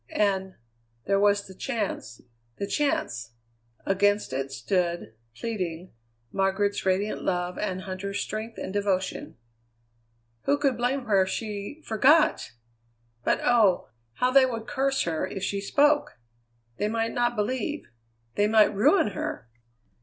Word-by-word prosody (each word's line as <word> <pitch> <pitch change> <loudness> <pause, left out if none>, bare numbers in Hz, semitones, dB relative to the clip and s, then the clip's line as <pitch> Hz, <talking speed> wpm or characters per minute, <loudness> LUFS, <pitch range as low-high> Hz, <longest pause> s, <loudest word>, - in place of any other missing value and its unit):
And 190 -2 +1 0.5
there 195 0 +2
was 205 0 +3
the 190 - -11
chance 205 - -4 0.4
the 200 - -2
chance! 120 - -1 0.5
Against 205 -4 +2
it 135 +1 -2
stood, 175 - -1 0.2
pleading, 185 - -4 0.4
Margaret's 195 +1 0
radiant 195 +3 0
love 180 -1 -1
and 185 -3 -2
Huntter's 195 +1 -4
strength 220 +2 -4
and 190 - -5
devotion. 195 - -1 1.1
Who 285 - +3
could 275 -3 +1
blame 245 +2 -1
her 200 -4 +4
if 190 - 0
she 215 +7 -5
forgot? 280 - +3 0.7
But - - +1
oh! 220 -7 +3 0.2
how 250 - +1
they 265 0 +6
would 230 -3 -4
curse 270 0 0
her 165 +2 -1
if 190 0 -6
she 200 0 -1
spoke! 290 +8 +2 0.6
They 210 - 0
might 225 +1 -1
not 240 -1 +1
believe; 255 +8 -2 0.5
they 205 - +2
might 215 -1 +5
ruin 215 - +4
her! 175 - -5
205 Hz, 130 wpm, -27 LUFS, 190-240 Hz, 1.1 s, they